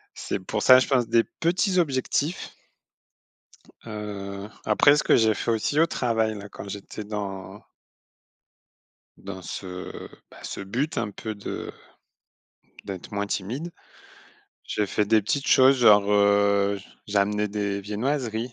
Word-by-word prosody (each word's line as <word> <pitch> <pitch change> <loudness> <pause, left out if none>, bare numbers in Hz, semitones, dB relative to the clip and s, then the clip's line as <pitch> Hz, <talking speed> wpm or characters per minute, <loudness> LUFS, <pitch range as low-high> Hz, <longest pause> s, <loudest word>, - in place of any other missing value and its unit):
C'est - - -3
pour 95 - -3
ça, 130 0 +8
je 130 - +2
pense, 125 -4 +2
des 115 -1 +4
petits 180 +3 0
objectifs. 145 +1 -1 1.3
Heu, 100 -2 -6 0.2
après, 140 +7 +5
ce 150 - +1
que - - +5
j'ai 110 -1 +3
fait 115 - -2
aussi 115 +7 +1
au 165 - +5
travail 115 -7 0
là, 100 0 -9
quand 100 - -10
j'étais 100 +2 -7
dans 100 -1 -6 1.6
dans 95 -1 -8
ce, 90 -1 -7 0.2
bah, - - -15
ce - - -5
but 120 +11 -2
un 105 - -1
peu 110 +2 -6
de 100 - -6 1.1
d'être 95 -2 -7
moins 100 0 -2
timide, 125 - -4 0.9
j'ai 105 - -1
fait 105 - 0
des 110 0 +4
petites 140 +7 -1
choses, 135 +1 +6
genre, 105 -4 +6
heu, 100 0 +3 0.3
j'ai 105 0 -3
amené 105 +1 +1
des 100 -1 -2
viennoiseries, 115 +2 -2
105 Hz, 140 wpm, -25 LUFS, 100-125 Hz, 1.6 s, ça